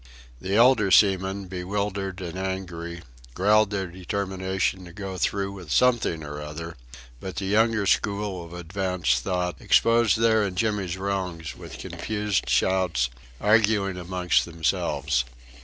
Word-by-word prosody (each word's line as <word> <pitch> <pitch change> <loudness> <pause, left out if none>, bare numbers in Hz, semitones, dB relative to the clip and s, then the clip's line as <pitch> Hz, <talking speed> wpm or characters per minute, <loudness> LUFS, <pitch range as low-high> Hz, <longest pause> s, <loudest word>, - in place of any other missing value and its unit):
The 95 +7 -2
elder 115 -3 +5
seamen, 95 0 +3
bewildered 95 +1 -3
and 90 -1 -5
angry, 90 -3 -5 0.3
growled 105 +2 +4
their 100 -2 -2
determination 95 +1 -2
to 85 - -12
go 95 -1 -6
through 100 +1 0
with 95 -5 -10
something 120 - +2
or 75 0 -6
other; 80 +3 -7 0.4
but 95 +3 -6
the 100 - -3
younger 110 +1 +2
school 100 -2 0
of 85 - -12
advanced 90 +1 -1
thought 90 -2 -2
exposed 115 -3 +4
their 110 -1 +4
and 95 -3 -2
Jimmy's 100 -4 0
wrongs 95 -4 -3
with - - -10
confused 105 -3 -2
shouts, 85 -10 +2 0.3
arguing 105 -2 +3
amongst 90 0 +1
themselves. 80 -6 0
95 Hz, 130 wpm, -25 LUFS, 90-100 Hz, 0.4 s, elder